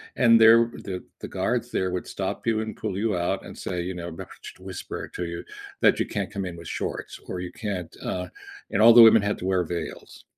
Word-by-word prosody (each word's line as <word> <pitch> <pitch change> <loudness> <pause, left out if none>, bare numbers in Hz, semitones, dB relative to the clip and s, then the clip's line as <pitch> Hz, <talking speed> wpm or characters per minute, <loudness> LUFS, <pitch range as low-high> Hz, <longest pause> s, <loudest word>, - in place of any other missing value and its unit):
and 115 -2 +6
they're 115 +1 +8
the 95 -2 -6 0.2
the - - -5
guards - - -2
there 95 - 0
would 90 0 -4
stop 95 +1 -4
you 115 -2 +1
and 110 0 -6
pull 100 -4 -3
you 105 -2 0
out 85 0 -1
and - - -10
say, 90 -2 -3
you 90 +1 -4
know 85 -1 -5
not 80 - -8
sh - - -11
whisper 95 -1 -7
to 90 - -3
you 85 0 -5 0.4
that - - +4
you - - +1
can't - - -3
come 100 -1 -3
in 85 -2 -6
with 85 0 -10
shorts - - -5
or 90 - -4
you 90 -1 -5
can't, 95 -6 -5
uh, 90 0 -3 0.4
and 105 - 0
all 115 +1 +9
the 120 - +10
women 115 -1 +8
had 105 +1 -1
to - - -5
wear 95 -1 +2
veils. 85 -1 -7
95 Hz, 235 wpm, -25 LUFS, 90-110 Hz, 0.4 s, the